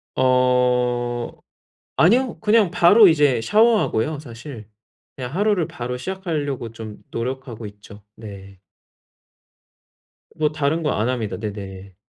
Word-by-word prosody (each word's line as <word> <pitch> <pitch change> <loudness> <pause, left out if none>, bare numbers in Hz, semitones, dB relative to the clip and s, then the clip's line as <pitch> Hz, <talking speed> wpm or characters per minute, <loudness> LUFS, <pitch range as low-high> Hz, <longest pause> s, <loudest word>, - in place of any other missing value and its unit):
어 125 -1 +1 0.7
아니요. 240 +9 +3
그냥 215 -3 +3
바로 195 +5 +6
이제 145 -7 +3
샤워하고요 205 - +2
사실. 120 -4 -10 0.5
그냥 130 +1 -7
하루를 200 -4 +1
바로 125 +1 -5
시작하려고 145 - -4
좀 110 -2 -9
노력하고 120 -2 -5
있죠. 105 0 -14
네. 100 -3 -11 1.8
뭐 150 -1 0
다른 155 +2 -1
거 150 - 0
안 110 +4 -1
합니다. 115 -5 -3
네네. 100 -3 -8
125 Hz, 235 characters per minute, -21 LUFS, 115-160 Hz, 1.8 s, 바로